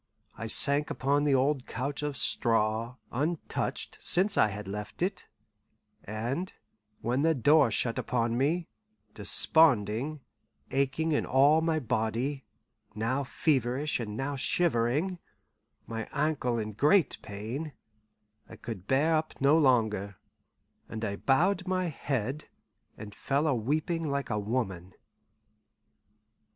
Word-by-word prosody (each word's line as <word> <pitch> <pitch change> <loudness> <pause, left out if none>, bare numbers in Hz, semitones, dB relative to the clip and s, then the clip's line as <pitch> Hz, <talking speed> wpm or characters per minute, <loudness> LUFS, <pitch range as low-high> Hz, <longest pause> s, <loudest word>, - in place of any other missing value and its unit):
I 115 - -5
sank 140 +5 +3
upon 145 +2 +1
the 140 -2 +3
old 135 0 +1
couch 140 +4 -3
of 145 -2 -3
straw, 115 +1 +1 0.2
untouched 155 +6 -2
since 195 +3 +2
I - - +5
had 105 0 -6
left 105 - -5
it; 190 +1 -3 0.8
and 120 - -3 0.5
when 125 +4 0
the 160 +1 +3
door 145 +1 +5
shut 115 +2 0
upon 115 -2 0
me, 160 +7 0 0.5
desponding, 130 +3 +2 0.5
aching 140 +4 0
in 150 - +1
all 145 +4 +5
my 165 -1 +1
body, 120 +2 -2 0.5
now 120 +6 -1
feverish 135 +1 0
and 105 -2 -5
now 140 +1 -2
shivering, 155 +4 0 0.7
my 115 -1 -5
ankle 140 -5 0
in 110 -1 -3
great 150 - +3
pain, 115 +10 -6 0.8
I - - -10
could 105 -5 -8
bear 150 +5 +3
up 155 0 -2
no 140 +3 +4
longer, 110 -9 +2 0.7
and 110 0 -4
I 100 -2 -2
bowed 185 - +1
my 185 -1 0
head 135 -1 -3 0.5
and 105 -1 -9
fell 140 +7 -1
a 150 - +2
weeping 155 +7 -1
like 140 0 -2
a 105 - 0
woman. 100 -5 -3
135 Hz, 125 wpm, -29 LUFS, 115-155 Hz, 0.8 s, I